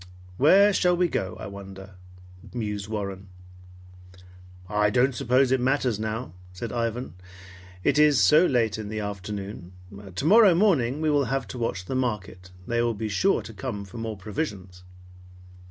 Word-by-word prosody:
"Where 200 +8 +6
shall 180 -2 +2
we 180 0 +3
go, 95 - -3
I - - -6
wonder?" 95 -1 -10 0.6
mused 105 -3 -3
Warren. 100 -3 -5 1.4
"I 105 +1 +2
don't 125 +4 +2
suppose 125 +2 +2
it 130 -1 +2
matters 130 -4 +1
now," 110 -3 -4 0.2
said 110 +6 -6
Ivan. 115 -1 -3 0.7
"It - - +2
is 150 -4 +5
so 155 +4 +5
late 115 -4 +1
in 105 -1 -6
the 110 0 -4
afternoon. 100 -2 -6 0.4
Tomorrow 190 - +5
morning 155 - +2
we 155 -1 +2
will 145 -2 +2
have 135 +1 -2
to 120 - -7
watch 95 -6 -3
the 130 - -5
market. 105 -7 -3 0.2
They 120 +3 0
will 120 -1 0
be 110 +1 -4
sure 190 - +1
to 115 - -10
come 105 -1 -5
for 100 +4 -10
more 110 -2 -4
provisions." 95 - -5
115 Hz, 155 wpm, -25 LUFS, 100-135 Hz, 1.4 s, Where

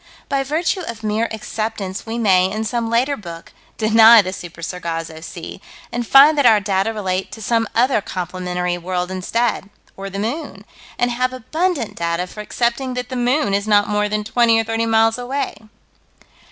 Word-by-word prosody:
By 275 -1 +1
virtue 320 +7 -1
of 225 -1 -7
mere 215 +2 0
acceptance, 215 -2 -4
we 225 +1 -3
may, 190 -5 +3
in 215 +2 -2
some 230 +1 -2
later 250 +5 +1
book, 170 -6 -10 0.2
deny 225 0 +7
the 185 0 -4
Super 170 -2 -9
Sargasso 165 -2 -5
Sea, 170 +3 -9 0.3
and 240 -1 -3
find 285 +3 +7
that 280 - +3
our 220 -2 +6
data 195 +2 0
relate 190 -3 -3
to 220 - -9
some 225 +1 0
other 245 -1 +3
complementary 180 -1 -3
world 180 +1 -3
instead 205 +3 -1 0.3
or 195 0 -6
the 195 - -7
moon 220 -1 -4 0.3
and 245 0 +1
have 255 +1 -1
abundant 290 - -2
data 170 +1 -1
for 210 +3 -9
accepting 240 +4 -1
that 250 0 -4
the 255 - -5
moon 245 -1 +1
is 200 +1 0
not 205 -1 +4
more 210 0 0
than 210 0 -1
twenty 230 +1 +3
or - - +1
thirty 225 +1 -1
miles 225 +1 +3
away. 265 +3 -3
220 Hz, 180 wpm, -19 LUFS, 190-240 Hz, 0.3 s, deny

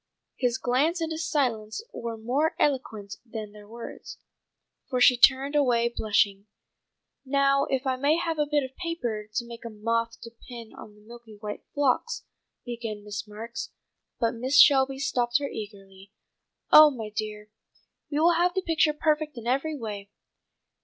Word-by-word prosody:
His 245 -1 0
glance 280 +8 +1
and 325 -1 -2
his 320 0 -3
silence 235 - -1
were 230 -1 -5
more 270 +9 0
eloquent 220 -8 -1
than 220 -3 -7
their 210 0 -14
words, 230 +2 -9 0.7
for 255 -3 0
she 250 0 +7
turned 270 +3 +4
away 240 -5 +3
blushing. 205 -1 +1 0.8
"Now 275 0 +2
if 265 0 -2
I 260 -1 0
may 285 +4 +2
have 330 -2 -2
a 295 - +2
bit 295 -1 +1
of 260 0 -8
paper 240 -12 -4
to 235 +3 -2
make 235 0 -10
a 230 - -6
moth 230 +2 -2
to 230 - -9
pin 235 -1 -11
on 210 - -12
the 210 - -20
milk 235 +2 -13 0.2
white 210 -1 -5
phlox," 290 - 0 0.4
began 230 -4 -5
Miss 205 +1 -6
Marks, 225 +3 -7 0.5
but 230 -1 +1
Mrs. 260 +5 +6
Shelby 270 -2 +3
stopped 245 -3 +1
her 285 -1 -3
eagerly. 195 -4 -10 0.6
"Oh, 305 0 +10
my 225 -6 -6
dear, 215 -1 -5 0.6
we 295 0 -1
will 340 +2 +5
have 350 +1 +2
the 380 - 0
picture 320 -2 +2
perfect 305 -1 0
in 230 - -8
every 275 +5 0
way. 205 -4 -6
245 Hz, 165 wpm, -27 LUFS, 220-290 Hz, 0.8 s, Oh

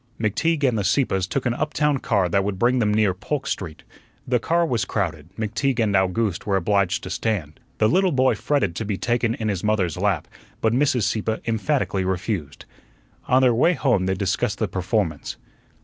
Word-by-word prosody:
McTeague 145 +9 0
and 115 -4 +1
the - - -1
Sieppes 95 -3 +1
took 135 +4 -2
an 120 - +1
uptown 150 0 0
car 100 -8 +1
that 100 +3 +1
would 100 -1 -2
bring 125 +5 +2
them 105 -3 +2
near 105 -2 +2
Polk 135 +10 -4
Street. 80 -6 -5 0.4
The 125 -1 +2
car 170 +7 +1
was 120 -7 0
crowded; 80 -7 -3
McTeague 115 +4 -1
and 110 -3 +2
Owgooste 95 +1 0
were 100 - +2
obliged 100 0 +1
to - - -6
stand. 90 -9 -2 0.2
The 110 - +3
little 185 - +3
boy 130 -1 +3
fretted 120 - 0
to - - -2
be 100 -2 -2
taken 120 0 0
in 110 - -3
his 100 -4 -2
mother's 100 -6 0
lap, 95 -4 0 0.3
but 110 0 +1
Mrs. 130 -3 +2
Sieppe 110 +2 0
emphatically 115 -3 0
refused. 95 -4 -3 0.6
On 130 +1 +4
their 125 -2 +5
way 150 +10 +3
home 120 -10 +1
they 95 - +1
discussed 95 -1 -1
the - - 0
performance. 90 -4 -2
110 Hz, 190 wpm, -23 LUFS, 95-125 Hz, 0.6 s, their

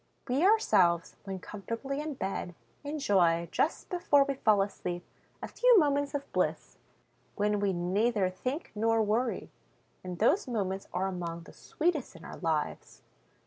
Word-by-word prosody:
We 265 +6 +1
ourselves, 200 - +3
when 195 -1 -4
comfortably 230 +9 -5
in 300 -1 -4
bed, 190 -5 -4 0.3
enjoy, 190 - +2
just 315 - 0
before 345 -6 +4
we 275 0 -2
fall 215 -6 +3
asleep, 175 -3 -5 0.4
a - - -3
few - - +4
moments 285 -3 +2
of 280 - -5
bliss, - - -1 0.6
when 210 0 +1
we 200 -1 +1
neither 190 +4 +1
think 255 - -4
nor 225 +1 +2
worry; 225 +3 -1 0.5
and 180 -1 -6
those 265 - +2
moments 195 -5 -2
are 180 +2 -1
among 170 -3 -4
the - - -14
sweetest 315 -5 -2
in - - -12
our - - -8
lives. 160 -3 -3
210 Hz, 145 wpm, -30 LUFS, 185-280 Hz, 0.6 s, before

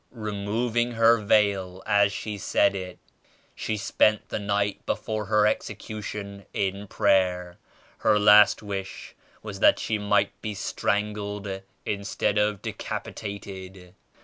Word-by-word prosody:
* - - -43
removing 115 +2 -2
her 115 0 +5
veil 100 -3 +1
as 100 -1 +3
she 105 +1 -5
said 100 0 +2
it. 90 -2 -6 0.6
She 110 - -3
spent 105 +1 +2
the - - -2
night 100 0 -1
before 110 -1 -2
her 105 +1 +3
execu 105 0 -2
tion 100 -1 -7
in 100 +1 -2
prayer. 90 -4 +1 0.4
Her 110 -1 +3
last 105 0 +6
wish 95 -2 -6 0.3
was 100 -2 -7
that - - +5
she 110 -1 -2
might 105 -1 +2
be 105 -1 -4
strangled 100 -1 -2 0.2
instead 105 0 -1
of 105 -1 0
decapitated. 95 -3 -7
100 Hz, 125 wpm, -26 LUFS, 100-105 Hz, 0.6 s, last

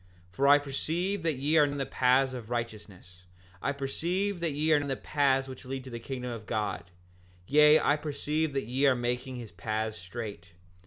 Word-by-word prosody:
7:19 - - -29
For 135 +8 +1
I 145 +1 +8
perceive 165 +7 -2
that 160 -2 0
ye 145 +5 +1
are 150 - +7
in 145 0 -1
the 135 - -1
paths 130 +1 +2
of 120 -3 -7
righteousness; 105 -6 -6 0.4
I - - 0
perceive 175 +8 -2
that 165 -3 -1
ye 155 +2 +2
are - - +6
in 145 -1 -2
the 135 - -1
path 135 -1 +1
which 130 -1 -9
leads 130 0 -5
to 130 - -9
the 120 - -5
kingdom 125 0 -5
of 115 -2 -7
God; 105 -5 -2 0.6
yea, 150 +4 +6
I 145 - +2
perceive 150 +1 -2
that 135 -4 -1
ye 130 +5 +2
are 130 - +5
making 125 +2 -2
his 120 -4 -8
paths 110 +4 -3
straight. 90 -3 -7
135 Hz, 205 wpm, -29 LUFS, 120-145 Hz, 0.6 s, I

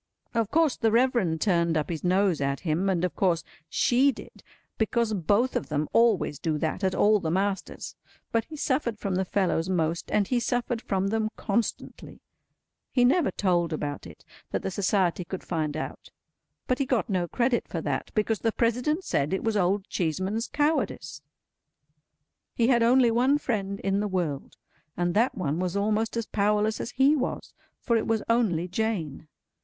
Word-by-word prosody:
Of 230 -3 0
course 320 -2 +2
the 225 - +2
Reverend 230 -9 +2
turned 170 -4 +2
up 155 +2 -2
his 160 - -4
nose 185 -3 +2
at 140 0 -1
him, 175 +3 0
and 180 -2 +1
of 180 - -4
course 170 -4 +1 0.3
she 260 +3 +3
did—because 230 -2 -4
both 205 +7 +1
of - - -2
them 150 0 -1
always 225 - +3
do 155 -2 -1
that 160 +5 -2
at 190 -1 +1
all 210 0 +4
the 165 - -3
masters—but 195 +4 -3
he 315 - -10
suffered 260 -5 -1
from 200 -2 -3
the 190 +1 0
fellows 185 -3 0
most, 165 -2 -1
and 205 -2 +1
he 250 - +1
suffered 240 -1 -1
from 195 -2 -1
them 220 0 0
constantly. 220 +2 -3 0.7
He 245 -2 +3
never 280 +5 +3
told 175 -4 0
about 145 - -4
it, 80 - -15 0.2
that - - -3
the 190 - -2
Society 190 -2 +1
could 185 +2 -6
find 155 -3 -2
out; 155 - -6 0.6
but 255 - 0
he 275 - +1
got 245 -3 +1
no 185 -4 0
credit 240 +4 0
for - - -4
that, - - -2
because 215 -1 +1
the 225 - +1
President 250 - 0
said 140 - 0
it 190 - -1
was 225 -1 0
Old 195 0 +1
Cheeseman's 190 +7 -2
cowardice. 290 - -1 1.3
He 235 +1 +2
had 240 -3 +4
only 240 +1 +5
one 255 +5 +3
friend 200 -8 -2
in 195 0 0
the 210 - 0
world, 170 -8 -3 0.4
and 175 0 0
that 230 +5 +2
one 160 -3 -2
was 185 +1 -1
almost 215 +3 0
as 230 - -1
powerless 210 +1 +1
as - - -4
he 270 +4 +3
was, 260 -3 -3 0.3
for 235 - 0
it 225 - 0
was 225 -1 0
only 210 -8 +1
Jane. 180 -7 -3
200 Hz, 175 wpm, -27 LUFS, 175-235 Hz, 1.3 s, only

